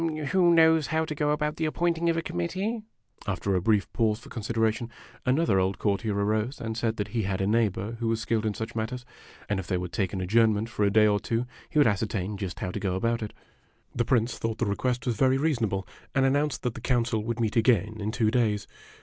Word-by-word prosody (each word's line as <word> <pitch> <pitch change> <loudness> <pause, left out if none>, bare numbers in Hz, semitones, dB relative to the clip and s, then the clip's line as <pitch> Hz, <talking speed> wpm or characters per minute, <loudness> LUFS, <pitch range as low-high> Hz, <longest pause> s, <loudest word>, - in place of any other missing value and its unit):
Who 180 -1 +5
knows 160 -2 +5
how 160 0 0
to 155 - -4
go 150 0 0
about 150 0 0
the 160 - 0
appointing 170 +1 0
of 165 - +1
a 165 - -1
committee? 190 - -2 0.2
' 110 - -22
After 100 0 -1
a 90 - +2
brief 105 0 +2
pause 110 -2 +2
for - - -14
consideration, 115 0 -1 0.4
another 125 -7 +3
old 95 0 0
courtier 105 0 0
arose 110 +5 0
and 115 -1 -4
said 115 -1 -1
that 105 - -2
he 115 - -1
had 95 -2 -2
a 95 - +1
neighbor 110 0 0
who 115 - -1
was 115 0 +1
skilled 115 -1 0
in 105 - -2
such 110 0 -5
matters, 120 +3 -3
O 125 - -21
and 105 -2 0
if 95 - -6
they 90 - 0
would 90 -1 -5
take 95 -6 0
an 95 - -3
adjournment 110 +3 +2
for 120 -3 -1
a - - +4
day 110 +1 +5
or 105 -1 +3
two 115 +4 -1 0.2
he 155 - -3
would 145 - +6
ascertain 105 -1 0
just 95 -3 -5
how 90 - -2
to - - -4
go 95 -2 -1
about 115 +4 0
it. 105 - -4 0.6
The 120 - +1
Prince 120 -2 +1
thought 115 -1 -2
the 120 - 0
request 125 +5 -1
was 120 -4 -1
very 130 +2 +3
reasonable, 115 -10 0 0.3
and 135 -1 +4
an 135 - +3
nounced 145 +1 0
that 125 -3 -2
the 120 - -9
council 115 -3 +1
would 115 +1 -3
meet 110 -2 0
again 110 -2 +3
in 105 - -1
two 110 -2 +1
days. 110 -5 +1
115 Hz, 245 wpm, -27 LUFS, 105-125 Hz, 0.6 s, would